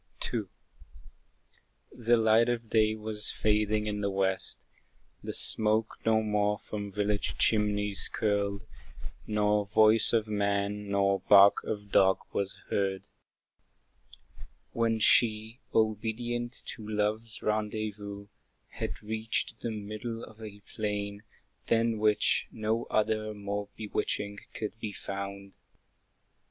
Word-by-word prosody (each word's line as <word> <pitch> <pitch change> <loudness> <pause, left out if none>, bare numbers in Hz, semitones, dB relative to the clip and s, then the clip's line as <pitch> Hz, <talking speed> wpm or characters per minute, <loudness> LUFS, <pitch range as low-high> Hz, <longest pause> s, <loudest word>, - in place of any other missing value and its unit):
II. 110 -4 -1 1.5
The 120 0 +2
light 110 +1 +4
of 120 -2 -3
day 110 -1 +3
was 105 -1 +1
fading 105 0 +1
in 105 -1 -2
the 100 - 0
west, 95 -1 +1 0.6
The - - -5
smoke 110 0 +2
no 110 -1 +3
more 105 -1 +1
from 100 -1 -6
village 105 +1 -1
chimneys 105 -2 +2
curled, 100 -1 -1 0.6
Nor 105 -1 +1
voice 110 +1 +5
of 110 -2 +1
man, 100 0 -1
nor 100 -1 +2
bark 100 0 +6
of 105 -2 -5
dog 95 0 +5 0.2
was 100 -1 -1 0.2
heard; 95 -1 -1 1.7
When 115 -1 +1
she, 110 +1 +3
obedient 120 +3 -1
to 110 -2 -7
Love's 110 +1 -2
rendezvous, 105 -1 -3 0.4
Had - - -6
reached 110 +1 -3
the 120 - -3
middle 110 +2 -5
of 110 0 -13
a 105 -2 -9
plain, 100 -1 -4 0.5
than 115 -1 +2
which 105 -1 +2
No 110 +1 -1
other 110 0 0
more 100 0 -4
bewitching 105 -1 -3 0.2
could 110 0 -5
be 105 -2 -5
found. 100 0 -7
105 Hz, 115 wpm, -29 LUFS, 100-110 Hz, 1.7 s, bark